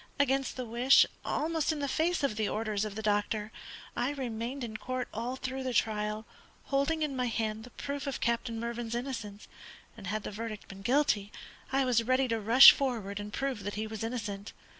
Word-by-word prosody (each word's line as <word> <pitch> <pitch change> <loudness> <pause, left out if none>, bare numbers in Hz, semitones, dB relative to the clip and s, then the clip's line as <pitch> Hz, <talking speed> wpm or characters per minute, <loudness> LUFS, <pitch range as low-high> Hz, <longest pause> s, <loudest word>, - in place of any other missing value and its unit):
Against 270 -1 +1
the 255 - -3
wish, 240 +4 +5 0.2
almost 320 0 0
in 310 - -3
the 285 -1 -2
face 320 +3 +1
of 275 -6 +1
the 215 -1 0
orders 215 -1 -1
of 210 -2 -6
the 220 - -5
doctor, 210 +1 0 0.4
I 245 +2 0
remained 250 0 -4
in 220 -2 -5
court 255 +2 -3
all 235 +4 -3
through 260 0 -4
the 255 -2 -3
trial, 215 0 0 0.4
holding 285 +3 0
in 290 -3 -2
my 250 -1 0
hand 220 -1 -2
the - - -12
proof 280 +3 -5
of 275 - -2
Captain 235 -1 -1
Mervyn's 235 0 -3
innocence, 235 -5 -5 0.5
and 205 -4 -9
had 215 +1 -2
the - - -5
verdict 215 0 -6
been 195 0 -10
'guilty' 220 -4 +2 0.4
I 270 0 +2
was 245 -2 +3
ready 255 +3 +2
to 230 0 0
rush 230 +5 +10
forward 220 -7 -2
and 205 0 -6
prove 270 -2 -2
that 205 +1 -4
he 215 +1 -2
was 220 0 -5
innocent. 210 -4 -4
235 Hz, 200 wpm, -30 LUFS, 215-265 Hz, 0.5 s, rush